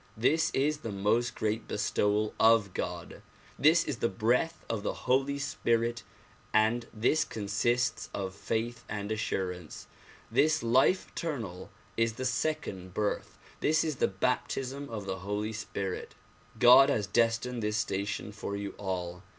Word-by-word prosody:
This 160 Hz, +8 st, +3 dB
is 150 Hz, +2 st, +1 dB
the 115 Hz, -7 st, -5 dB
most 105 Hz, +5 st, +1 dB
great 110 Hz, +1 st, -2 dB
bestowal 105 Hz, +1 st, 0 dB
of 110 Hz, -4 st, +5 dB
God. 90 Hz, -1 st, -5 dB, 0.4 s
This 160 Hz, +4 st, +5 dB
is 130 Hz, -, -3 dB
the 115 Hz, -, +1 dB
breath 125 Hz, +9 st, 0 dB
of 110 Hz, -3 st, -2 dB
the -, -, -4 dB
Holy 135 Hz, +2 st, +2 dB
Spirit 120 Hz, -3 st, 0 dB, 0.5 s
and 115 Hz, +2 st, +2 dB
this 125 Hz, +8 st, +2 dB
consists 120 Hz, +1 st, -1 dB
of 95 Hz, -1 st, -4 dB
faith 115 Hz, +5 st, -3 dB
and 105 Hz, -1 st, -4 dB
assurance. 90 Hz, -6 st, -3 dB, 0.5 s
This 155 Hz, -4 st, +3 dB
life 130 Hz, +10 st, +3 dB
eternal 115 Hz, -, -5 dB, 0.3 s
is 115 Hz, 0 st, +2 dB
the 130 Hz, +3 st, -5 dB
second 115 Hz, -, -2 dB
birth; 105 Hz, -1 st, -2 dB, 0.2 s
this 155 Hz, +1 st, +3 dB
is 155 Hz, -4 st, -2 dB
the -, -, +3 dB
baptism 130 Hz, +7 st, -2 dB
of 105 Hz, -3 st, -5 dB
the 95 Hz, -1 st, -3 dB
Holy 105 Hz, +3 st, -3 dB
Spirit. 100 Hz, -3 st, -4 dB, 0.4 s
God 125 Hz, +3 st, +8 dB
has 110 Hz, -7 st, +1 dB
destined 115 Hz, +3 st, +1 dB
this 105 Hz, 0 st, 0 dB
station 100 Hz, -1 st, -2 dB
for 100 Hz, -1 st, -5 dB
you 100 Hz, 0 st, -4 dB
all. 90 Hz, -2 st, -3 dB
110 Hz, 140 wpm, -30 LUFS, 100-125 Hz, 0.5 s, God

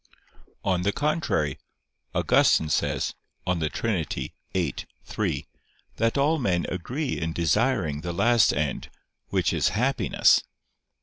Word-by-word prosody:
On 95 Hz, -2 st, +1 dB
the 100 Hz, +3 st, +1 dB
contrary, 145 Hz, -, 0 dB, 0.6 s
Augustine 80 Hz, -, +3 dB
says 75 Hz, -, 0 dB, 0.3 s
(De 85 Hz, -4 st, 0 dB
Trin. 105 Hz, -4 st, -1 dB
xiii, 85 Hz, -7 st, -3 dB, 0.3 s
3) -, -, -2 dB, 0.5 s
that 115 Hz, +4 st, +1 dB
all 150 Hz, +3 st, +2 dB
men 90 Hz, -9 st, +1 dB
agree 130 Hz, -, -3 dB
in 80 Hz, -1 st, -2 dB
desiring 85 Hz, -, +1 dB
the 85 Hz, +1 st, -4 dB
last 115 Hz, +5 st, +4 dB
end, 75 Hz, -2 st, -2 dB, 0.4 s
which -, -, +1 dB
is -, -, +2 dB
happiness. 130 Hz, +5 st, +3 dB
95 Hz, 115 wpm, -26 LUFS, 80-125 Hz, 0.6 s, last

